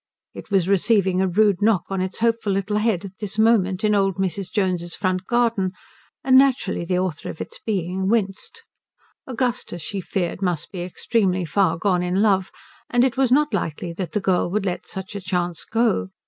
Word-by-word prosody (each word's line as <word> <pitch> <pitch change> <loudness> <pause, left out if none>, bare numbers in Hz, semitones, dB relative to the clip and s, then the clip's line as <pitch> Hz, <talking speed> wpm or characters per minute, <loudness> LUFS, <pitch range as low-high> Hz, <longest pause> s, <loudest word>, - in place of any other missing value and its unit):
It - - -10
was 190 -4 +2
receiving 195 -1 +2
a 190 - +2
rude 200 +1 +2
knock 205 -5 +3
on 190 -1 -1
its 185 0 -3
hopeful 230 -3 +1
little 195 +2 -1
head 210 -4 0
at 190 -1 -11
this 205 -1 -4
moment 215 -3 +3
in 210 0 +3
old 195 -2 +2
Mrs. 190 0 -3
Jones's 180 -4 -1
front 185 -1 -1
garden, 230 -6 +1 0.5
and 260 0 +6
naturally 265 -10 +1
the 180 +1 -1
author 180 -5 -2
of - - -8
its - - -7
being 190 -2 -1
winced. 225 - -1 0.6
Augustus, 240 - -2
she 195 +3 -4
feared, 180 0 -3
must 175 -4 -2
be 180 - -5
extremely 185 0 0
far 185 +3 +1
gone 180 0 +1
in 180 +2 0
love, 195 -3 +2 0.4
and 245 0 +3
it 260 -2 +1
was 265 -2 +2
not 295 +3 +3
likely 170 +2 -3
that 175 -2 -5
the - - +1
girl 185 -3 +1
would 200 +2 -1
let 180 -2 -3
such 190 +1 -7
a 200 - -4
chance 180 -2 -2
go. 225 - +1
195 Hz, 190 wpm, -22 LUFS, 180-215 Hz, 0.6 s, and